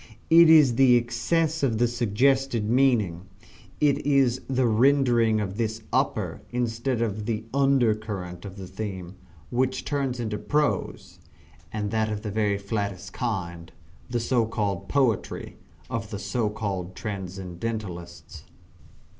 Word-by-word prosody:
It 165 0 +8
is 150 -7 +6
the 130 -2 +6
excess 160 +7 0
of 125 -6 +1
the 120 +2 +3
suggested 120 +1 +1
meaning 110 -8 +2 0.5
it 145 -1 +2
is 135 -3 +2
the 130 -1 +2
rendering 120 -1 +3
this 105 +2 -2
the 110 - -19
upper - - 0
instead 120 0 -1
of 105 -1 -3
the 110 -1 -2
under 135 -5 +3
current 100 -5 -6
of 100 -1 -9
the 95 - -7
theme 95 -2 -6 0.4
which 130 +1 0
turns 135 -4 -1
into 110 -3 -3
prose 150 0 -1 0.5
(and 105 -2 -3
that 110 -1 0
of 105 0 -4
the 105 - -3
very 105 -1 +1
flattest 100 -2 -4
kind), 85 -8 -4 0.4
the 120 - -1
so 120 -1 +1
called 100 -5 -2
poetry 130 -8 0 0.3
of 115 -2 -4
the 100 - -5
so 105 +3 -1
called 95 -4 -4
transcendentalists. 95 -2 -6
110 Hz, 135 wpm, -26 LUFS, 100-130 Hz, 0.5 s, It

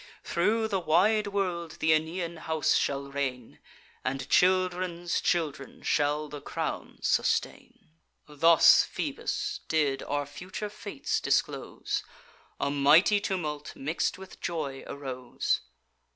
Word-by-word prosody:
Through 220 +6 +1
the 195 - 0
wide 200 +6 +3
world 180 -5 -2
th' - - -9
Aeneian 165 +2 0
house 160 -2 +1
shall 140 0 0
reign, 130 -4 -4 0.4
And 130 +1 -2
children's 180 -1 +2
children 160 -4 -2
shall 150 +1 +1
the 145 -1 -8
crown - - -4
sustain.' - - -1 0.4
Thus 165 +2 +6
Phoebus - - -3
did 145 -4 +1
our 145 0 -2
future 180 +8 -6
fates 275 - -3
disclose: - - -1 0.6
A 140 - 0
mighty 155 +9 +5
tumult, 155 -7 -3
mix'd 155 +7 -1
with 190 0 -12
joy, 145 -6 -3
arose. 130 -3 -2
160 Hz, 110 wpm, -28 LUFS, 145-185 Hz, 0.6 s, Thus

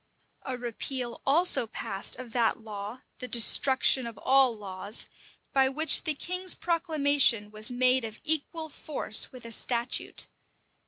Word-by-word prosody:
A 260 -2 -6
repeal 245 +1 -5
also 305 -4 +3
passed 200 -3 -2
of 240 -2 -10
that 235 -3 0
law, 210 +3 -8 0.2
the 250 - -6
destruction 260 +1 +4
of 230 -3 -10
all 265 +3 +3
laws, 200 -1 -4 0.5
by 265 -1 +3
which 315 +6 +3
the 310 -2 0
king's 365 +4 -1
proclamation 290 - +1
was 215 0 -1
made 255 +1 +2
of 220 -1 -8
equal 315 +1 -1
force 285 -7 0
with 250 -2 -13
a 230 - -8
statute. 240 +2 +1
255 Hz, 140 wpm, -27 LUFS, 225-285 Hz, 0.5 s, destruction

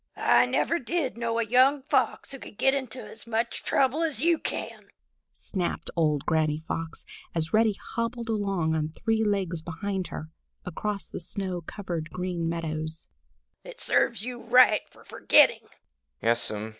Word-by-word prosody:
"I - - +4
never 340 - +1
did 290 +1 -2
know 230 -1 -2
a 230 - +2
young 260 +5 +4
Fox 280 - 0
who 275 - -7
could 205 - -11
get 270 +4 +4
into 260 -2 -5
so 235 - -14
much 225 +1 -1
trouble 275 +3 +2
as 315 -7 -1
you 330 +3 +3
can!" - - -5 0.4
snapped 180 -4 -3
old 150 -4 +1
Granny 155 -1 +1
Fox, 165 0 -4 0.3
as 160 -1 -1
Reddy 220 -2 +3 0.2
hobbled 230 0 -2
along 195 -7 0
on 155 -1 0
three 220 +7 0
legs 190 -5 0
behind 185 +3 -3
her, 155 +1 -7 0.3
across 200 +2 -3
the - - -6
snow 185 0 -3
covered 170 -2 -5
Green 180 -2 -2
Meadows. 160 -1 -4 0.5
"It - - -11
serves 205 - +1
you 245 -1 -6
right 240 -2 +6
for - - -19
forgetting!" - - +4
205 Hz, 150 wpm, -27 LUFS, 165-240 Hz, 0.5 s, right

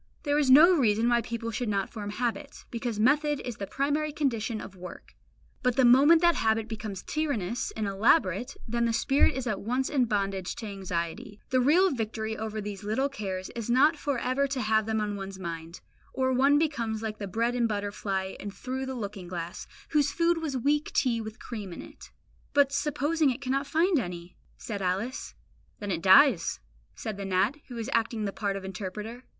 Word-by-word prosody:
There 290 0 +2
is 285 -3 +2
no 310 +8 +8
reason 225 -5 +2
why 240 0 +3
people 230 0 -4
should 230 +1 -2
not 200 -2 -1
form 210 -3 -6
habits, 230 -1 -4
because 235 -2 -3
method 290 +5 +3
is 245 -3 -5
the 200 - -5
primary 295 +5 0
condition 240 -7 -1
of 195 - -9
work; 180 0 -10 0.5
but 250 -1 +1
the 260 - +4
moment 285 +7 +7
that 345 0 +6
habit 220 -5 +1
becomes 215 -3 -6
tyrannous 245 - -2
and 215 - -1
elaborate, 205 - +2
then 235 +1 0
the 230 - +1
spirit 270 +4 +3
is 265 -1 -3
at 215 -5 -2
once 250 +5 -1
in 265 -4 +3
bondage 195 -4 -2
to 225 - -7
anxiety. 190 0 -4
The 255 - +3
real 345 +9 +4
victory 220 -3 -3
over 220 0 -4
these 205 0 -6
little 225 +7 0
cares 190 -8 -5
is 235 -1 -6
not 275 +6 +5
for 285 -2 -2
ever 255 +3 0
to 270 -2 -2
have 220 0 +2
them 220 0 0
on 205 -1 -2
one's 195 0 -7
mind; 170 -2 -7 0.3
or 260 0 +1
one 275 +3 +4
becomes 230 -8 -1
like 215 -1 -4
the 200 - -4
bread 230 +5 0
and 240 -1 +1
butter 205 -2 -2
fly 190 -2 -3
in 205 - -5
Through 260 +5 -5
the 265 - -4
Looking 200 -5 -6
Glass, 175 -1 -6 0.2
whose 295 -2 +2
food 335 +2 +2
was 290 -5 -2
weak 290 +4 +1
tea 235 -4 +1
with 220 0 -7
cream 210 -6 -7
in 170 - -7
it. - - -13 0.4
"But 285 -1 +4
supposing 295 +2 +1
it 255 +1 -2
cannot 275 +1 -1
find 335 +1 +2
any?" 175 -4 -6 0.2
said 205 -3 -5
Alice. 195 +8 -2 0.4
"Then 205 -2 -4
it 165 -2 -2
dies," 190 - +5 0.4
says 215 -3 -5
the 200 - -5
gnat, 195 +8 +1
who 245 - -8
is 225 0 -4
acting 230 -1 0
the 200 - -3
part 200 -2 -2
of 195 -1 -6
interpreter. 210 +6 -6
230 Hz, 200 wpm, -28 LUFS, 205-270 Hz, 0.5 s, no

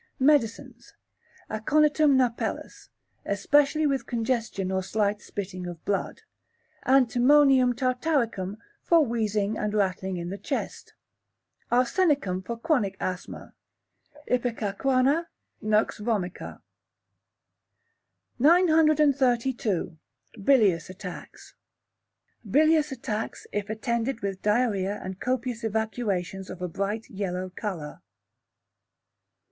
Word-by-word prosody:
Medicines. 260 -5 0 0.5
Aconitum 300 +5 +3
napellus, 245 -3 -2 0.3
especially 290 +9 +2
with 275 -4 0
congestion 230 -5 -2
or 190 0 0
slight 205 +2 -1
spitting 185 -2 -6
of 175 -2 -9
blood; 200 -1 -2 0.6
Antimonium 260 0 +5
tartaricum 245 - -1 0.2
for 330 -3 +4
wheezing 215 -3 -1
and 210 0 -2
rattling 190 -2 -1
in 170 +1 -5
the 200 - -6
chest; 270 +8 -5 0.8
Arsenicum 250 - +1
for 235 +5 -5
chronic 235 - 0
asthma; 185 0 -5 0.7
ipecacuanha; 255 +6 +1 0.3
Nux 215 0 +3
vomica. 205 -5 -3 1.8
932. 280 - +3 0.4
Bilious 200 -11 +3
Attacks 185 -1 -10 1.0
Bilious 305 +3 +3
attacks, 225 -4 -4
if 205 0 -3
attended 235 +2 -2
with 195 -1 -4
diarrhoea 210 -3 +1
and 190 0 -6
copious 250 -2 -2
evacuations 210 -4 -2
of - - -8
a - - -1
bright 200 +5 -3
yellow 185 -2 -4
colour. 175 -9 -5
225 Hz, 90 wpm, -26 LUFS, 195-265 Hz, 1.8 s, Antimonium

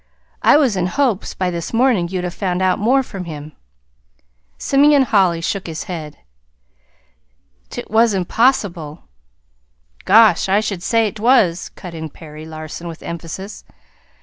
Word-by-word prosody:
I - - +6
was 265 -9 +2
in 180 -1 0
hopes, 240 -2 -1
by 185 -1 -1
this 170 +3 -5
morning, 230 -7 +2
you'd 185 -1 -3
have 180 -1 -4
found 185 -3 -2
out 185 +2 +2
more 255 +6 +3
from 195 -6 -8
him." 155 -2 -8 1.1
Simeon 285 0 +4
Holly 190 -8 +2
shook 190 +3 -3
his 160 -1 -5
head. 155 -5 -7 1.5
"'T - - -6
was 225 -1 +3
impossible." 185 - 0 1.0
"Gosh! 210 -3 +5
I 200 +2 +4
should 200 -4 -3
say 225 +2 +2
't 215 - -11
was," 215 -8 +3
cut 180 -2 -9
in 160 -1 -6
Perry 155 +1 -11
Larson, 155 +2 -8
with 165 -1 -9
emphasis. 170 +4 -7
185 Hz, 145 wpm, -19 LUFS, 170-225 Hz, 1.5 s, I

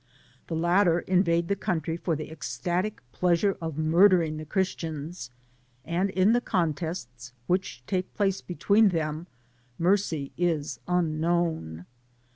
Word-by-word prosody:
The 165 - -3
latter 175 +1 +3
invade 170 -2 +2
the 200 - +1
country 165 -4 -2
for 170 -1 -1
the 155 +1 -6
ecstatic 175 +6 -3
pleasure 180 - +2
of 160 -3 -4
mur 165 +6 +5
dering 165 -5 +1
the 155 - -7
Christians, 165 - -3 0.6
and 175 +4 0
in 190 +3 +3
the 240 - +3
contests 155 - -3
which 180 -7 -1
take 185 +3 -2
place 195 -2 +1
between 200 +4 +3
them 160 -1 -2 0.5
mercy 170 -6 +1
is 160 -4 0
unknown. 165 - 0
170 Hz, 125 wpm, -27 LUFS, 155-185 Hz, 0.6 s, mur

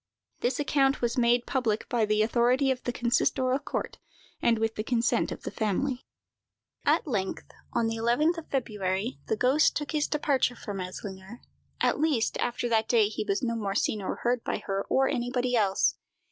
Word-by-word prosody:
This 250 +3 -1
account 275 -1 +2
was 235 0 0
made 240 -1 +3
public 230 -5 -1
by 235 -4 +1
the 215 0 +2
authority 245 +4 +2
of 255 -1 -2
the 245 - 0
consistorial 255 +2 +1
court, - - -4 0.4
and 230 -1 +3
with 225 0 0
the 215 - -3
consent 235 +1 +1
of - - -7
the - - -4
family. 245 +5 -1 0.8
At - - +2
length, 205 -10 -3 0.2
on 230 - +1
the 225 0 -1
11th 295 +9 +2
of 320 - -13
February, 210 -3 -2
the 220 - 0
ghost 265 +7 +3
took 295 -1 -3
his 300 -2 +1
departure 280 -4 +1
from 205 -3 -6
Eslinger; 190 +4 -7 0.4
at - - +1
least, 290 -7 +1
after 240 0 -1
that 220 -1 +1
day 220 -4 +4
he 215 - -3
was 200 +1 -1
no 235 -1 0
more 200 -3 -2
seen 210 0 0
or 190 - -3
heard 245 0 +1
by - - -1
her 195 0 -2
or 265 0 +3
anybody 245 0 0
else. 200 -4 +2
235 Hz, 185 wpm, -28 LUFS, 215-260 Hz, 0.8 s, day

